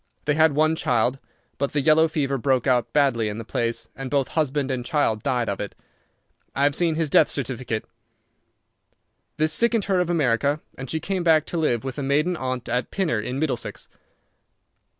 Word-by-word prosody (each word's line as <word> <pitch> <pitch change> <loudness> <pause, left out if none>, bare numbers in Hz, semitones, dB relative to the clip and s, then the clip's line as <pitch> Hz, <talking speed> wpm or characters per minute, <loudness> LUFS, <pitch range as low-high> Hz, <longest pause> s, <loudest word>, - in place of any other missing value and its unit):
They 150 - +2
had 160 0 +4
one 155 +1 +3
child, 125 -2 +1 0.4
but 140 0 -1
the 145 - +1
yellow 160 +3 +5
fever 140 -4 -1
broke 130 -1 +1
out 125 -4 +1
badly 135 -7 +2
in 105 - -5
the 115 - -6
place, 115 0 -2
and 135 -1 -6
both 140 -1 0
husband 145 -3 0
and 125 -2 -2
child 120 -4 0
died 120 -1 0
of 100 - -2
it. 105 - -5 0.8
I 140 - +1
have 145 0 +3
seen 165 +1 +1
his 160 0 0
death - - +4
certificate. 120 -4 -3 1.5
This 155 0 +2
sickened 235 0 +2
her 190 -2 +1
of 180 -1 0
America, 145 -2 +1 0.2
and 135 -1 -8
she 160 - -1
came 190 +1 -2
back 160 -2 +4
to 175 - -4
live 125 -7 +1
with 135 +1 -5
a - - -2
maiden 150 +6 +1
aunt 130 -5 -4
at 125 0 -1
Pinner, 170 - 0
in 125 +5 -4
Middlesex. 155 -1 -3
140 Hz, 190 wpm, -24 LUFS, 125-155 Hz, 1.5 s, yellow